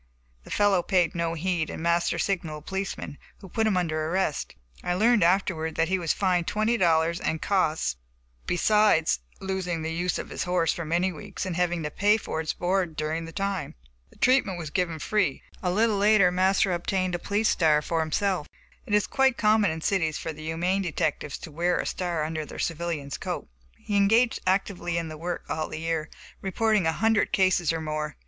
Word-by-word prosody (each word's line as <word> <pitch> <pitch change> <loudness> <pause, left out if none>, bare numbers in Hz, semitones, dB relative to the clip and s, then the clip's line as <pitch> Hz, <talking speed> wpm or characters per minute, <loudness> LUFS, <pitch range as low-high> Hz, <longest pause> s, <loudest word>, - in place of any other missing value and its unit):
The - - -12
fellow 205 -3 +3
paid 175 -2 +1
no 170 -1 -1
heed, 170 -1 -1
and - - -6
Master 170 0 +1
signaled 160 -6 -2
a - - -29
policeman, 195 -6 -4 0.2
who 195 - -12
put 220 +4 0
him 200 -4 +2
under 155 -3 -1
arrest. 180 -4 -1 0.3
I 180 - 0
learned 225 +3 +4
afterward 170 -3 +1
that 165 0 +1
he 190 0 +1
was 170 -2 0
fined 180 -3 +1
twenty 215 +2 +1
dollars 170 -4 +2
and 160 - -1
costs, 160 - 0 0.5
besides 175 - +3 0.2
losing 185 -4 -3
the 160 0 -2
use 175 +2 -1
of - - -6
his - - -3
horse 180 -3 +1
for 170 - -5
many 175 +4 +1
weeks 190 +5 -6
and 185 -2 -3
having 175 -1 0
to 150 - -3
pay 205 +5 +3
for 160 -6 -4
its 160 - -2
board 180 -2 -1
during 155 +2 -2
the 165 - -8
time. 195 +1 -3 0.3
The - - -22
treatment 250 -8 +2
was 160 -4 -6
given 170 -2 -1
free. 195 -2 0 0.2
A 180 - 0
little 215 +3 +2
later 200 -2 +5
Master 190 +1 +2
obtained 185 +1 -1
a 175 - -1
policeman's 205 +4 +1
star 155 -3 +3
for 165 +1 -1
himself. 160 +1 0 0.4
(It 210 - +2
is 210 - +3
quite 265 -2 +2
common 215 -1 +4
in 160 0 -4
cities 160 -4 0
for 160 - -4
the 155 - -11
humane 170 +5 0
detectives 160 -5 -2
to 160 - -10
wear 175 +4 +1
their - - -1
star 175 -4 -2
under 160 0 -3
a 150 - -8
civilian's 165 -4 -3
coat.) - - -4 0.3
He 205 - -2
engaged 225 +4 +3
actively 185 -2 0
in 165 -1 -2
the 155 - -8
work 175 +1 -4
all 155 0 -2
the - - -6
year, 165 -1 -2 0.3
reporting 205 -1 +1
a - - +3
hundred 220 +6 +2
cases 185 -3 +3
or 165 -1 -2
more. 155 -1 -3
175 Hz, 200 wpm, -26 LUFS, 160-195 Hz, 0.5 s, later